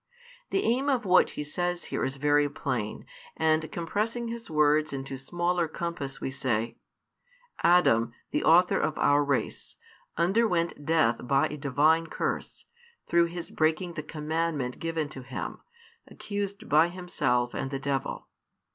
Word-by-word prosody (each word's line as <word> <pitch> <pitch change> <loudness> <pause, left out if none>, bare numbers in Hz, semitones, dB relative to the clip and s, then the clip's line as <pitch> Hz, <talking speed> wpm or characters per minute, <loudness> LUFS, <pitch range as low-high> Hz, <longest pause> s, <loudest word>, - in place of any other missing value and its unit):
The 390 - 0
aim 260 +5 +1
of 255 -5 +1
what 185 -1 +5
He 150 - -2
says 175 +4 -2
here - - 0
is 135 - -1
very 145 +1 +3
plain, - - -3 0.3
and 155 0 +1
compressing 215 +8 -2
His 235 -2 -7
words 150 0 +3
into 135 0 -5
smaller 175 +5 -1
compass 160 -4 -5
we 135 - -3
say: 120 -4 -1 0.8
Adam, 145 -10 +4 0.2
the - - 0
author 175 +3 +5
of 155 -1 -1
our 145 +1 +4
race, 140 -2 -2 0.4
underwent 175 -3 +1
death 155 -8 +3
by 140 +3 +3
a 150 - -5
Divine 150 +4 +2
curse, - - -4 0.4
through 170 0 +3
his 170 0 -6
breaking 160 +3 0
the 160 - -4
commandment 155 -3 -2
given 165 -2 -2
to 135 - -9
him, 130 +1 -6 0.5
accused 200 -1 -5
by 155 +3 +5
himself 145 -9 -1
and 135 - -3
the 135 - -3
devil. 135 -1 -3
160 Hz, 145 wpm, -28 LUFS, 140-175 Hz, 0.8 s, what